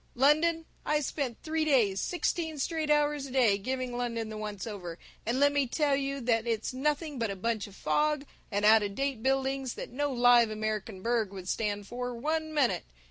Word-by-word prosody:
London 315 +5 +3 0.2
I 300 - +1
spent 270 -4 -3
three 315 0 0
days, 235 -10 +3
sixteen 335 -3 -1
straight 310 +2 -1
hours 295 -1 +2
a - - -10
day, 235 -6 +3
giving 255 +3 -3
London 230 -2 -2
the 215 - -6
once 210 -3 -5
over, 180 -6 -6 0.3
and 240 +3 +1
let 285 0 +5
me 285 -2 +1
tell 290 +2 +1
you 275 0 -2
that 230 -1 +1
it's 225 +2 -1
nothing 295 +1 -1
but 230 -2 0
a 200 - -3
bunch 220 +2 -2
of 200 - -14
fog 300 +2 +1 0.3
and 205 0 0
out 220 +1 +7
of 200 -1 -3
date 275 -3 -1
buildings 270 0 0
that - - -7
no 290 +3 -1
live 245 -2 +5
American 215 -2 -3
burg 230 -4 +1
would 190 -2 -8
stand 205 0 -1
for 245 +3 -4
one 315 +5 -1
minute. 290 -5 +1
250 Hz, 195 wpm, -30 LUFS, 220-290 Hz, 0.3 s, out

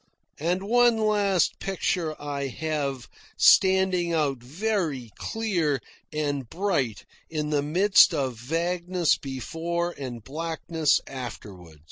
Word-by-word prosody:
And 175 +5 0
one 240 +2 +4
last 205 -4 +2
picture 180 -4 -2
I 140 -1 -3
have, 140 -2 -3 0.3
standing 190 -2 +4
out 145 -5 0
very 150 - -2
clear 180 - 0 0.3
and 145 -5 -2
bright 160 - -1 0.2
in 150 -1 -2
the 145 -1 +2
midst 185 +9 +5
of 135 -6 -1
vagueness 170 +7 0
before 165 +6 -3
and 125 -7 -7
blackness 160 +2 0
afterward. 100 - -9
160 Hz, 105 wpm, -26 LUFS, 135-185 Hz, 0.3 s, midst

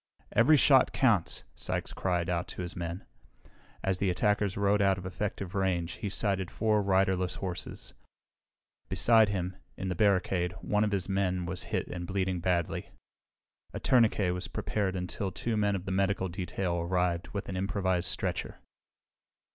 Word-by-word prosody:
"Every 150 +6 +5
shot 135 -2 +5
counts!" 110 -10 +2
Sykes - - -3
cried 90 -2 0
out 90 -1 -1
to 90 - -6
his 85 - -6
men. 85 +1 -5 0.8
As 95 -1 0
the 100 - +1
attackers 105 +2 +1
rode 100 0 +3
out 95 -1 +3
of 90 - -8
effective 95 0 -4
range 90 -3 0
he 105 - -1
sighted 95 -2 -1
four 110 -2 +1
riderless 95 -2 +2
horses. 90 -3 -5 1.0
Beside 110 +3 +5
him, 95 -2 -2 0.2
in 95 - -3
the - - 0
barricade, 95 -2 +2
one 105 +3 0
of 105 - 0
his 95 -2 -1
own 95 - -2
men 90 -2 0
was 90 0 -3
hit - - -1
and 90 -1 -5
bleeding 95 -1 -1
badly. 85 -1 -1 0.9
A - - -2
tourniquet 110 -7 +3
was 90 - -4
prepared 100 -3 -2
until 95 +2 -3
two 115 +3 -2
men 105 -1 +2
of 95 -1 -5
the 95 - -3
medical 95 0 +1
detail 90 0 -2
arrived 90 0 0
with 100 - -5
an 95 - -4
improvised 95 -2 0
stretcher. - - -2
95 Hz, 165 wpm, -30 LUFS, 90-100 Hz, 1.0 s, Every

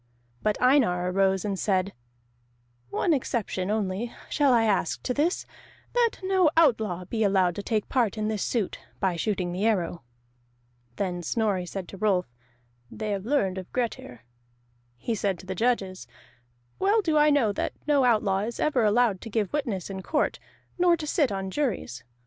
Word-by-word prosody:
But 210 -1 0
Einar 205 -10 +3
arose 190 0 +2
and 195 -2 -2
said: 195 -1 0 1.0
"One 335 - +1
exception 220 -8 -2
only 210 +2 -1 0.2
shall 285 -3 +3
I 235 -2 +4
ask 200 -6 0
to 250 - -1
this, 310 +7 0 0.5
that 480 -2 +2
no 375 -3 +3
outlaw 220 - +3
be 220 +4 -1
allowed 190 -3 +3
to - - -2
take 215 0 -1
part 235 -5 +1
in 215 0 -1
this 215 -2 -2
suit, 225 -6 -1 0.2
by 190 -3 +1
shooting 180 0 -1
the 190 +5 0
arrow." 180 -5 0 0.9
Then 180 -3 -2
said 165 - -5
Snorri 205 -6 0
to 195 +1 -6
Rolf, 195 -4 +2 0.6
"They 215 -1 -4
have 200 +1 -3
learned 195 -10 +1
of 185 - -10
Grettir." 225 - -4 0.7
He 230 - -2
said 200 -3 -1
to 185 - -13
the 190 - -3
judges: 195 -3 -1 0.7
"Well 410 +3 +3
do 320 -4 +1
I 300 0 +5
know 280 -8 +3
that - - -2
no 290 -3 +3
outlaw 215 -5 +3
is 225 +3 -4
ever 270 -6 +2
allowed 215 -2 +3
to 225 - -7
give 210 -3 -1
witness 225 - -2
in 190 -1 -5
court, 300 - 0 0.4
nor 350 -1 +4
to 310 - -5
sit 295 - +1
on 195 -1 -3
juries. 185 - -2
210 Hz, 170 wpm, -26 LUFS, 190-250 Hz, 1.0 s, I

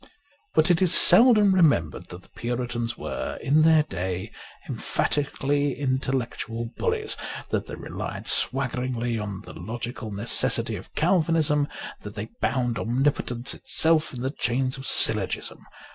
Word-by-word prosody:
But 155 +2 +4
it 175 +1 +2
is 180 -2 +7
seldom 210 0 +6
remembered 145 - +2
that 90 +1 -11
the - - -21
Puritans 120 -1 -4
were - - -5
in 150 +3 +2
their 160 -1 +5
day 95 -4 -4 0.4
emphatically 145 -1 -1
in 130 -2 0
tellectual 115 -3 -4
bullies, - - -1 0.4
that - - -1
they - - -6
relied - - -6
swaggeringly 120 -2 0
on 100 -2 -5
the - - -11
logical 120 0 -6
necessity 105 +4 0
of - - -11
Calvinism, 155 -4 +2 0.3
that 105 0 -10
they 110 +2 -6
bound 120 0 0
omnipotence 125 0 0
itself 160 -1 +2
in 125 -1 -7
the 130 - -1
chains 130 -1 -1
of 135 0 -5
syllogism. 105 -7 +2
130 Hz, 135 wpm, -25 LUFS, 115-150 Hz, 0.4 s, is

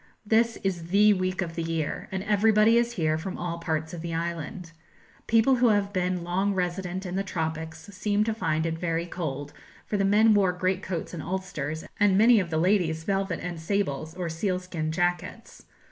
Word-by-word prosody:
This 225 +2 +2
is 175 -4 -2
the 205 +3 +5
week 185 0 -1
of 165 -2 -6
the 165 - -3
year, 165 -2 -3
and 190 0 -3
everybody 215 +2 +4
is 235 0 +2
here 155 -5 0
from 185 +3 -5
all 170 -1 -4
parts 160 -1 -2
of 170 - -6
the 165 -1 -4
island. 170 +1 -4 0.6
People 230 +4 +4
who 245 0 +4
have 205 -2 +2
been 180 -1 0
long 190 +3 0
resident 180 +1 -2
in 180 0 -4
the 195 - 0
tropics 160 -3 -4
seem 205 +2 +1
to 220 +1 -1
find 160 -7 -1
it 165 0 -2
very 165 -1 -1
cold; 145 -5 -5 0.3
for 210 - -2
the 195 - +1
men 215 +3 +5
wore 195 -3 +3
great 185 +1 0
coats 185 -4 -4
and 165 - -5
ulsters, 160 -4 -4 0.2
and 200 -2 +4
many 225 +2 +6
of 180 -3 -2
the 160 - -1
ladies 165 -2 +2
velvet 195 -2 -1
and 175 -2 -4
sables, 160 -4 -2
or 180 -2 -3
sealskin 175 -2 -2
jackets. 175 +2 -3
180 Hz, 190 wpm, -27 LUFS, 165-200 Hz, 0.6 s, many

